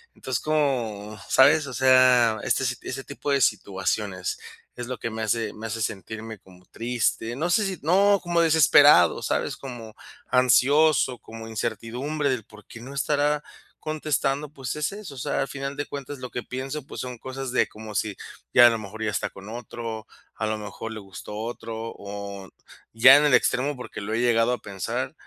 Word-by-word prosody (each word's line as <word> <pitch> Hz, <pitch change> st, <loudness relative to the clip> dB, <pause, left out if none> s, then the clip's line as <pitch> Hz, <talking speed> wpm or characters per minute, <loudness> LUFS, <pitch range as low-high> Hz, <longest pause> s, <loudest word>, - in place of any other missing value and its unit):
Entonces, 130 Hz, -4 st, -3 dB
es -, -, -14 dB
como, 120 Hz, -9 st, -1 dB
¿sabes?, 145 Hz, +3 st, +5 dB
o 130 Hz, -, -7 dB
sea, 125 Hz, -3 st, +5 dB
este -, -, +1 dB
si 125 Hz, -1 st, -1 dB
ese 135 Hz, +1 st, -5 dB
tipo 140 Hz, +1 st, -5 dB
de 140 Hz, -, +2 dB
situaciones 100 Hz, -3 st, -1 dB, 0.4 s
es 120 Hz, -, -5 dB
lo 130 Hz, -, -4 dB
que 115 Hz, -, -3 dB
me 110 Hz, 0 st, -5 dB
hace 110 Hz, +1 st, -1 dB
me 110 Hz, +1 st, -7 dB
hace 115 Hz, +1 st, -4 dB
sentirme 110 Hz, +1 st, -5 dB
como 90 Hz, -1 st, -19 dB
triste, 115 Hz, 0 st, -2 dB
no 160 Hz, +6 st, -1 dB
sé 205 Hz, +4 st, +3 dB
si 190 Hz, -4 st, -3 dB
no, 195 Hz, +6 st, +4 dB
como 175 Hz, -1 st, +1 dB
desesperado, 160 Hz, -3 st, +6 dB
¿sabes?, -, -, -1 dB
como 120 Hz, -5 st, -9 dB, 0.3 s
ansioso, 130 Hz, +2 st, +4 dB
como 115 Hz, 0 st, -10 dB
incertidumbre 120 Hz, +7 st, -3 dB
del 125 Hz, -5 st, -1 dB
por 105 Hz, -1 st, -17 dB
qué 115 Hz, -, -11 dB
no 135 Hz, +3 st, -9 dB
estará 145 Hz, +1 st, +1 dB, 0.4 s
contestando, 150 Hz, -2 st, -1 dB
pues, 135 Hz, -5 st, -5 dB
es 150 Hz, +5 st, -1 dB
eso, 200 Hz, -9 st, -9 dB
o -, -, -12 dB
sea, 125 Hz, -, -1 dB
al 135 Hz, -, -1 dB
final 140 Hz, 0 st, -5 dB
de 145 Hz, 0 st, -3 dB
cuentas, 140 Hz, 0 st, -7 dB
lo 125 Hz, -, -6 dB
que 120 Hz, -, -3 dB
pienso, 135 Hz, +3 st, -6 dB
pues, -, -, -6 dB
son 125 Hz, -1 st, -6 dB
cosas 130 Hz, +1 st, -6 dB
de 130 Hz, -, +2 dB
como 110 Hz, 0 st, -10 dB
si: 105 Hz, 0 st, -1 dB, 0.4 s
"Ya, 120 Hz, -, +9 dB
a -, -, +6 dB
lo 115 Hz, -1 st, -1 dB
mejor, 110 Hz, +1 st, -7 dB
ya 105 Hz, -, 0 dB
está -, -, -2 dB
con 100 Hz, +2 st, -12 dB
otro, 115 Hz, -1 st, -6 dB, 0.3 s
a 110 Hz, -, -2 dB
lo 110 Hz, 0 st, -1 dB
mejor, 110 Hz, +1 st, -7 dB
le 110 Hz, -, -7 dB
gustó 100 Hz, +1 st, -9 dB
otro", 115 Hz, 0 st, -5 dB, 0.2 s
o 100 Hz, -1 st, -7 dB, 0.4 s
ya 130 Hz, +5 st, +9 dB
en 150 Hz, -, +3 dB
el 145 Hz, -, +3 dB
extremo, 130 Hz, +4 st, +2 dB
porque 125 Hz, -3 st, -8 dB
lo 105 Hz, +2 st, -4 dB
he 115 Hz, -, +1 dB
llegado 120 Hz, 0 st, +3 dB
a -, -, -1 dB
pensar 95 Hz, -3 st, -4 dB
125 Hz, 195 wpm, -25 LUFS, 110-140 Hz, 0.4 s, Ya